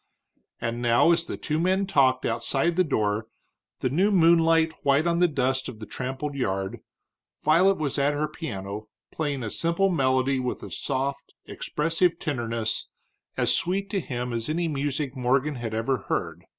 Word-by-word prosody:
And 120 0 -3
now 120 +7 +4
as 170 0 +2
the - - -4
two 155 +1 -2
men 190 +3 +2
talked 130 -9 +3
outside 135 +8 +1
the 185 - +4
door, 110 -7 0 0.5
the 130 - +1
new 185 +8 +3
moonlight 165 -3 +4
white 140 +3 +3
on 170 0 +1
the 180 - +5
dust 130 -3 0
of 110 - -9
the 110 - -8
trampled 135 +5 -4
yard, 95 -8 -2 0.6
Violet 180 +6 +4
was 145 -2 -2
at 145 +1 +2
her 150 +1 0
piano, 105 - -6 0.2
playing 145 -5 -2
a 105 - -4
simple 170 +4 +1
melody 130 -4 +2
with 125 -1 -3
a - - -8
soft, 140 0 -3
expressive 165 +3 0
tenderness 115 -6 -2 0.5
as - - +2
sweet 195 +3 -1
to 200 - +1
him 125 -6 -4
as 115 +3 -3
any 170 +2 0
music 145 -2 -2
Morgan 130 +3 +1
ever 115 +2 -1
had - - -16
heard. - - -2
140 Hz, 165 wpm, -26 LUFS, 125-165 Hz, 0.6 s, the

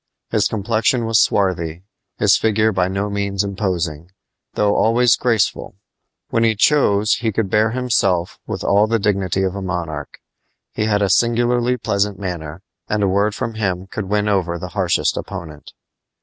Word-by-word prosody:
His - - +2
complexion 115 +3 0
was 115 -1 +3
swarthy, 90 -4 0 0.3
his - - +4
figure 110 0 +2
by 95 -2 +1
no 100 +2 -2
means 100 -1 -1
imposing, 90 -5 -3 0.5
though 105 -1 +2
always 120 +1 +4
graceful. 115 -5 0 0.6
When 115 - +2
he 110 -1 +2
chose 105 -4 +3
he 115 -1 -1
could 100 -2 -2
bear 110 +1 +3
himself 110 -8 0
with - - -4
all 105 +2 +3
the 115 +1 +1
dignity 100 -3 0
of 95 -1 -1
a 100 - -5
monarch. 85 -6 -5 0.5
He 110 - -1
had 105 -1 +1
a 100 - +1
singularly 120 +2 +2
pleasant 100 -3 -1
manner, 85 -3 -6 0.3
and 105 -1 0
a - - +3
word 100 +2 +1
from 115 - -3
him 95 -4 -2
could 100 +2 -5
win 105 +2 0
over 90 -4 0
the 90 +1 -7
harshest 95 -3 0
opponent. 75 -3 -8
100 Hz, 165 wpm, -19 LUFS, 95-110 Hz, 0.6 s, his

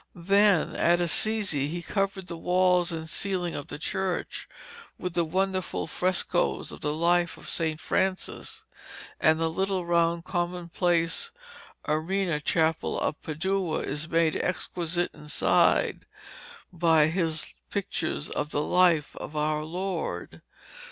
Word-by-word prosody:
Then, 195 0 +3
at 175 +1 +3
Assisi, 175 -4 +2
he 170 +3 -4
covered 195 -1 -1
the 170 -1 -6
walls 180 +1 +2
and 160 -1 -5
ceiling 180 -1 -1
of 145 - -6
the - - -7
church 190 +3 -3 0.5
with 180 -1 -4
the 170 - +2
wonderful 185 +3 -1
frescoes 180 -1 0
of - - -10
the 150 - 0
life 170 +2 +2
of - - -12
St. 160 -2 -1
Francis; 190 +3 -2 0.6
and 155 0 +4
the 165 - +1
little 190 +2 -1
round 170 0 +2
commonplace 175 - 0 0.6
Arena 165 +1 0
Chapel 160 +1 +1
of 150 - -2
Padua 170 +2 -1
is 150 +3 -4
made 165 -1 +2
exquisite 175 -1 -1
inside 150 0 +2 0.7
by 165 -3 +4
his 160 - -1 0.2
pictures 70 - -2
of 150 - -2
the 145 -1 -1
life 170 -4 +3
of 155 - -7
our 150 0 0
Lord. 170 - -4
170 Hz, 125 wpm, -27 LUFS, 160-185 Hz, 0.7 s, and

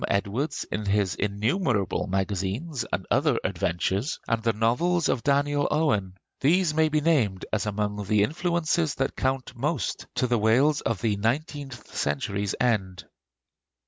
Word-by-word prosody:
Edwards 100 +9 -1
in 105 -1 -2
his 100 -2 +2
innumerable 105 - 0
magazines 100 - -2
and 95 - -2
other 135 -1 +3
adventures; 95 - -1
and 115 -1 0
the 115 0 +2
novels 130 +11 +1
of 120 - 0
Daniel 145 +1 +2
Owen, 105 -12 +1 0.2
these 165 +3 +3
may 160 0 +3
be 155 0 +1
named 125 - +1
as 110 0 0
among 105 0 -2
the 105 +1 +3
influences 165 - 0
that 135 - -1
count 130 -1 -2
most 135 - -2
to - - +1
the 120 -2 +1
Wales 130 +8 +3
of 115 -4 -2
the 110 -3 +1
nineteenth 135 +2 -3
century's 100 +8 -1
end. 100 -7 0
115 Hz, 145 wpm, -26 LUFS, 100-145 Hz, 0.2 s, other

